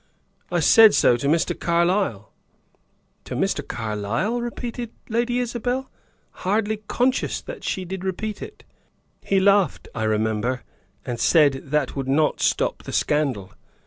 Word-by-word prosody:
I - - +1
said 225 -2 +7
so 120 - +5
to 140 - -2
Mr. 165 +3 +2
Carlyle." 170 - 0 0.9
"To - - -5
Mr. - - 0
Carlyle?" 115 - -2
repeated 240 0 -5 0.2
Lady 240 +2 0
Isabel, 250 +2 -2 0.5
hardly 215 +3 0
conscious 255 +1 0
that - - -9
she 185 - -2
did 190 +1 -6
repeat 205 +3 -4
it. - - -9 0.6
"He 195 - +2
laughed, 200 -2 +2
I 110 -2 -2
remember, 110 +3 0 0.4
and 120 -2 -4
said 145 -1 +4
that 145 -1 -1
would 135 -2 -3
not 150 +3 +1
stop - - +1
the - - -8
scandal. 135 -11 0
175 Hz, 135 wpm, -23 LUFS, -, 0.9 s, said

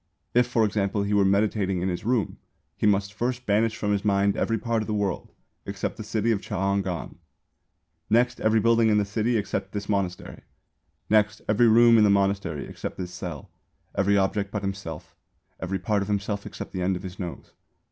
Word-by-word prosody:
If 125 0 +4
for 115 -3 +2
example 100 -1 0
he 100 +1 -1
were 100 -1 +4
meditating 100 -1 +1
in 90 - -1
this 90 -2 -3
room 115 -1 0 0.4
he - - +1
must 100 0 +1
first 125 +3 -2
banish 110 +2 +2
from 105 - -1
his 100 -1 0
mind 100 -1 +2
every 115 - 0
part 115 0 -1
of 110 - -5
the 110 - -1
world 100 -3 -2 0.3
except 100 0 -4
the 110 - -7
city 110 +2 0
of 100 -3 0
Ch'ang 100 -1 -1
an. 90 -3 -5 0.9
Next 120 +2 +2
every 110 +1 +3
building 115 0 +4
in 105 - +3
the 105 - +2
city 110 +3 0
except 100 -1 -3
this 105 -1 -4
monastery. 95 -3 -2 0.7
Next, 105 -1 +2
every 110 +3 +4
room 115 +1 +6
in - - +6
the 105 - +5
monastery 100 -6 +1
except - - -7
this 90 -1 -5
cell, 85 -5 -7 0.4
every 100 +1 +2
object 100 +1 0
but 100 0 -4
himself, 95 -6 -6 0.4
every 95 +1 -2
part 100 +3 0
of 100 - -3
himself 100 0 -2
except - - -8
the 95 - -4
end 95 +1 +1
of 90 - -7
his 95 0 -8
nose. 90 -3 -7
100 Hz, 200 wpm, -25 LUFS, 95-110 Hz, 0.9 s, room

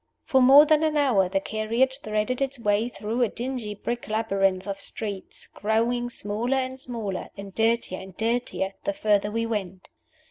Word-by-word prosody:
For 265 -4 +3
more 275 +4 +9
than 310 0 +4
an 310 -1 +1
hour 230 -11 +3
the 195 +1 +1
carriage 230 +6 0
threaded 215 +4 -1
its 275 0 -1
way 215 0 +1
through 230 +1 -3
a 240 - +3
dingy 240 -3 -4
brick 235 +4 -4
labyrinth 195 -4 +1
of 200 -1 -5
streets, 205 -4 -5
growing 235 +3 0
smaller 230 +4 -1
and 260 0 -3
smaller 225 -7 -4
and 200 -1 -8
dirtier 225 -3 +1
and 190 -1 -12
dirtier 225 -4 -1
the 200 - -1
further 205 0 +1
we 230 +2 -1
went. 190 -5 -4
225 Hz, 170 wpm, -25 LUFS, 205-245 Hz, -, more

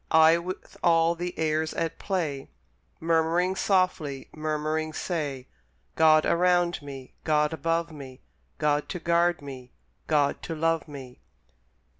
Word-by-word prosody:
I, 160 +1 +6
with 185 +2 -7
all 165 -1 +4
the 175 +1 -5
airs 155 0 0
at 165 -1 -2
play, 155 -9 -2 0.5
Murmuring 165 +3 +1
softly, 185 -9 0
murmuring 155 0 -2
say, 145 -7 -3 0.5
"God 155 -1 +5
around 175 -1 +2
me, 135 -2 -9
God 150 0 +2
above 165 +2 -1
me, 135 -4 -10 0.4
God 150 0 0
to 180 - -4
guard 170 -1 +1
me, 130 -3 -9 0.3
God 145 -2 +1
to 165 - -5
love 165 -1 0
me." 135 -4 -10
160 Hz, 125 wpm, -27 LUFS, 145-170 Hz, 0.5 s, I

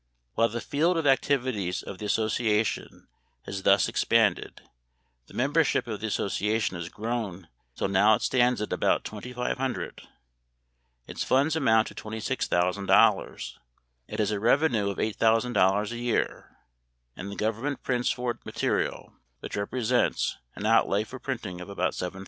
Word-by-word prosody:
While 115 0 +2
the 120 +1 -4
field 165 +9 +1
of 165 - -1
activities 130 -9 +1
of 95 - -8
the 105 - -4
association 110 0 0 0.4
has 95 - -5
thus 100 +1 +4
expanded, - - +1 0.6
the - - -15
membership 145 +3 +2
of 110 -3 -5
the 110 - -3
association 105 0 -1
has 85 0 -5
grown 105 -6 -4 0.3
until - - -1
now 100 +3 +5
it - - -5
stands 125 -3 +2
at - - -4
about - - +1
twenty 110 +4 -7
five 125 0 -2
hundred. 130 -2 -3 1.0
Its - - -4
funds 140 +4 +2
amount 115 -8 +3
to - - -12
$26,000. 100 -4 +1 0.5
It - - -6
has 105 -1 +1
a 105 - -1
revenue 115 -2 +2
of 100 - -4
$8,000 110 -2 +2
a 120 - -4
year, 120 -1 -2 0.6
and 100 - -7
the - - -6
government 115 +8 -2
prints 125 -1 0
for 125 -1 -1
it - - -11
material - - -2 0.3
which - - -6
represents 110 +3 0 0.2
an 105 - -5
outlay 110 -2 +3
for 130 +4 -10
printing 110 -10 -5
of 90 - -9
about 100 - -1
$7,000. 90 +1 -5
110 Hz, 150 wpm, -27 LUFS, 100-125 Hz, 1.0 s, now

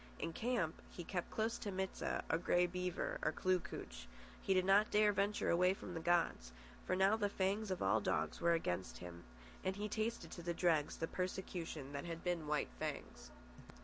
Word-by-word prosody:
In 165 - -3
camp 220 -9 -1
he 175 - -7
kept 180 +1 -3
close 225 +1 -1
to 205 - -3
Mit 190 0 -2
sah - - -1
or 160 - +1
Grey 175 0 +3
Beaver 180 0 -2
or 155 - +2
Kloo 185 +2 +2
kooch. 60 - -8 0.3
He - - -1
did 185 -1 +4
not 200 +2 +5
dare 210 0 +5
venture 200 +1 +1
away 180 +2 +4
from 180 - -7
the 165 - -3
gods, 165 - +1 0.4
for 185 - +2
now 190 +3 +5
the 205 -2 +1
fangs 200 +2 0
of 185 - -1
all 100 +3 +3
dogs - - 0
were 170 0 +4
against 95 - -1
him, 85 -1 -9 0.4
and 190 0 0
he 205 +1 -2
tasted 215 -5 -2
to - - -7
the 170 0 -2
dregs 165 -4 +2
the 165 - -1
persecution 175 -6 -4
that 140 +2 -4
had 165 -1 -5
been 175 -4 -1
White 150 0 +1
Fang's. - - -5
180 Hz, 200 wpm, -38 LUFS, 165-195 Hz, 0.4 s, not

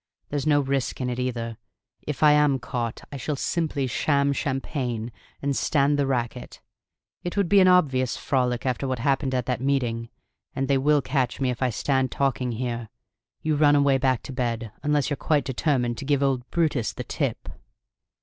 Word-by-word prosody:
There's 145 +1 -2
no 145 -1 +4
risk 135 -2 -1
in 125 -1 -1
it 120 - -4
either. 115 -2 -3 0.5
If 150 0 -2
I 150 - +8
am 150 -2 +4
caught 120 -2 -4
I 140 - -5
shall 145 +3 -2
simply 150 -1 -1
sham 140 +3 +1
champagne 130 -5 -3 0.3
and 140 -1 0
stand 145 +1 +2
the 140 - +2
racket; 125 -2 -3 0.6
it 175 +3 -4
would 200 -3 +2
be 200 +3 +5
an 185 - +6
obvious 135 -9 +3
frolic 125 -4 0
after 130 +1 -1
what 130 -1 -1
happened 135 +1 0
at 125 -2 0
that 125 -2 -2
meeting. 120 -4 0 0.5
And 135 0 -1
they 135 -1 +3
will 145 +1 +3
catch 130 -2 -1
me, 130 -2 +1
if 125 - -6
I 130 - +2
stand 130 +3 0
talking 130 -3 0
here: 120 -1 -3 0.5
you 155 -1 +1
run 145 0 +5
away 140 -2 +3
back 130 -3 +1
to 135 - -7
bed 115 -3 -2
unless 150 0 +1
you're 145 - 0
quite 150 -3 +1
determined 125 -3 0
to 140 - -6
'give 140 0 +2
old 130 -3 0
Brutus 150 -10 0
the - - -5
tip!'" - - -3
135 Hz, 190 wpm, -25 LUFS, 125-145 Hz, 0.6 s, I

